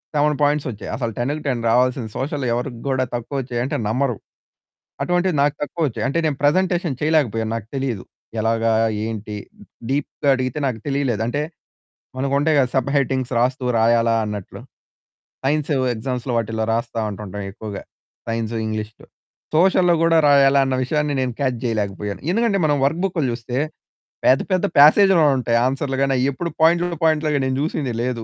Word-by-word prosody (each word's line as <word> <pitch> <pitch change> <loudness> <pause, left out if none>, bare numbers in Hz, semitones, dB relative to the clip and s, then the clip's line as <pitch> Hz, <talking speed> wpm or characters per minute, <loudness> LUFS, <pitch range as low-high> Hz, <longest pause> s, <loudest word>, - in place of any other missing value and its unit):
7 150 0 +2
points 145 -1 +2
వచ్చాయి. 105 -1 -8
అసలు 115 -4 -2
10కి 125 +4 0
10 125 -4 -1
రావాల్సింది. 125 -1 +2
సోషల్ 140 0 -2
ఎవరికి 120 -1 -3
కూడా 130 -1 +1
తక్కువ 120 +4 -5
వచ్చాయంటే 125 +1 -2
నమ్మరు. 125 +1 0 0.9
అటువంటివి 180 0 +1
నాకు 145 0 +1
తక్కువ 145 +3 -4
వచ్చాయి. 125 - -3
అంటే 140 - -1
నేను 145 -3 0
ప్రజెంటేషన్ 175 -1 +2
చేయలేకపోయాను, 120 -8 +1
నాకు 110 -2 -6
తెలీదు. 125 -8 -2 0.4
ఎలాగా, 115 +1 +1 0.3
ఏంటి 110 -1 -5 0.5
డీప్‌గా 140 +1 -1
అడిగితే 130 +3 -2
నాకు 115 -4 -3
తెలియలేదు. 135 -6 0
అంటే 145 +5 -1 0.8
మనకు 135 +1 -1
ఉంటాయి 155 +2 +2
గదా! 130 -2 +3
సబ్ 130 0 +1
హెడ్డింగ్స్ 130 -2 0
రాస్తూ, 125 +2 0 0.2
రాయాలా 115 0 +3
అన్నట్లు. 105 -2 -6 0.9
సైన్స్ 150 +1 0 0.2
ఎగ్జామ్స్‌లో 125 +2 -3
వాటిలో 110 0 -1
రాస్తా 115 0 -2
ఉంటాం 100 -1 -8 0.2
ఎక్కువగ. 105 0 -8 0.5
సైన్స్, 115 0 -2
ఇంగ్లీష్‌లో. 110 0 -5 0.5
సోషల్‌లో 180 0 +4
కూడా 165 0 +4
రాయాలన్న 135 -1 +4
విషయాన్ని 150 +2 0
నేను 125 -2 -1
కాచ్ 130 -4 0
చేయలేకపోయాను. 105 -2 -2
ఎందుకంటే 220 -2 +1
మనం 145 -1 +2
వర్క్ 160 +5 0
బుక్లు 175 -6 -1
చూస్తే, 120 +2 -4 0.7
పెద్ద 130 - +5
పెద్ద 185 +2 +2
పాసేజ్‌లో 170 +3 +7
ఉంటాయి, 115 -2 +1
ఆన్సర్‌లు 135 0 -2
గాని, 135 -1 +1
అవెప్పుడు 140 +6 -1
పాయింట్ 170 +2 +5 0.2
పాయింట్లగా 155 -2 +2
నేను 130 0 -1
చూసింది 145 -6 -2
లేదు. 120 -2 -2
130 Hz, 150 wpm, -21 LUFS, 115-150 Hz, 0.9 s, పాసేజ్‌లో